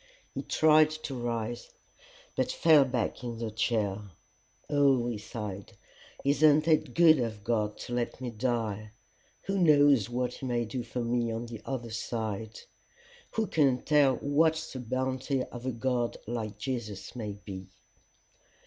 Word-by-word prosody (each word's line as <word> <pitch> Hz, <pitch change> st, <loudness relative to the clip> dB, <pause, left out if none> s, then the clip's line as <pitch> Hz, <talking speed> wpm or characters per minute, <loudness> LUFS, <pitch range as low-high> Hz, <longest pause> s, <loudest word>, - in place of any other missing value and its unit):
He -, -, -3 dB
tried 155 Hz, 0 st, +5 dB
to 155 Hz, -2 st, -6 dB
rise, 120 Hz, -1 st, -3 dB, 0.7 s
but -, -, 0 dB
fell 155 Hz, -5 st, +5 dB
back 125 Hz, 0 st, -2 dB
in 120 Hz, -2 st, -4 dB
the 115 Hz, -1 st, -4 dB
chair. 110 Hz, -2 st, 0 dB, 0.7 s
"Oh!" 140 Hz, -4 st, +3 dB
he 120 Hz, -3 st, -3 dB
sighed, 100 Hz, -3 st, -7 dB, 0.5 s
"isn't 150 Hz, +2 st, +4 dB
it 155 Hz, -5 st, +2 dB
good 160 Hz, -3 st, +7 dB
of 110 Hz, -4 st, -3 dB
God 105 Hz, -2 st, 0 dB
to 120 Hz, -, -6 dB
let 120 Hz, 0 st, -2 dB
me 125 Hz, -2 st, -4 dB
die! 110 Hz, -3 st, -2 dB, 0.5 s
Who 195 Hz, 0 st, -1 dB
knows 145 Hz, -, +5 dB
what 125 Hz, 0 st, -1 dB
he 135 Hz, -, -7 dB
may 120 Hz, -1 st, 0 dB
do 125 Hz, +3 st, -4 dB
for 120 Hz, +1 st, -4 dB
me 120 Hz, 0 st, 0 dB
on 115 Hz, +1 st, -3 dB
the 115 Hz, -2 st, -8 dB
other 120 Hz, -4 st, -4 dB
side! 110 Hz, -1 st, -4 dB, 0.7 s
Who 225 Hz, -, +1 dB
can 140 Hz, -9 st, +2 dB
tell 145 Hz, -3 st, +4 dB
what 155 Hz, +5 st, +2 dB, 0.2 s
the 130 Hz, -, -5 dB
bounty 130 Hz, +2 st, -1 dB
of 125 Hz, 0 st, -8 dB
a -, -, +1 dB
God 120 Hz, 0 st, -1 dB
like 110 Hz, -2 st, -4 dB
Jesus 120 Hz, -5 st, -5 dB
may 105 Hz, -4 st, -4 dB
be!" 100 Hz, -2 st, -9 dB
120 Hz, 150 wpm, -29 LUFS, 110-140 Hz, 0.7 s, good